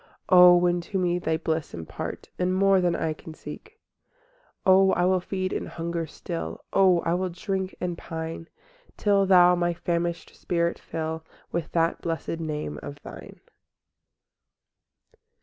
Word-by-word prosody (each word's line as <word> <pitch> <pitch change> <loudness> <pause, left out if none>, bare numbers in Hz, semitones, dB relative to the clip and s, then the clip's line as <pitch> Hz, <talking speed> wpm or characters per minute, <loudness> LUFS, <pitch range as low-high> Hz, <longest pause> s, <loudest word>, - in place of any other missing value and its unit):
O, 180 -1 +9
when 175 0 +2
to 195 +3 -4
me 180 -1 +1
Thy 160 -2 0
bliss 160 -1 -2
impart, 80 -2 -6
And 180 +1 +1
more 195 0 +4
than 175 -1 +1
I 160 -2 -1
can 155 +1 -11
seek? 430 - -11
VIII - - -38 0.2
O 190 0 +5
I 175 - +2
will 185 0 +3
feed 185 +1 -3
and - - -3
hunger 170 0 -3
still, 165 +2 -6
O 185 -3 +5
I 165 - 0
will 185 +1 0
drink 190 +1 -3
and 175 -1 -2
pine 165 0 -6 0.5
Till 200 -2 +3
Thou 180 -1 +7
my 175 -1 0
famished 170 0 -2
spirit 170 -1 -1
fill 160 0 -4 0.3
With 165 -2 -3
that 165 0 +1
blest 165 -1 -3
name 150 - -4
of 70 0 -8
Thine. - - -11
175 Hz, 150 wpm, -26 LUFS, 165-185 Hz, 0.5 s, O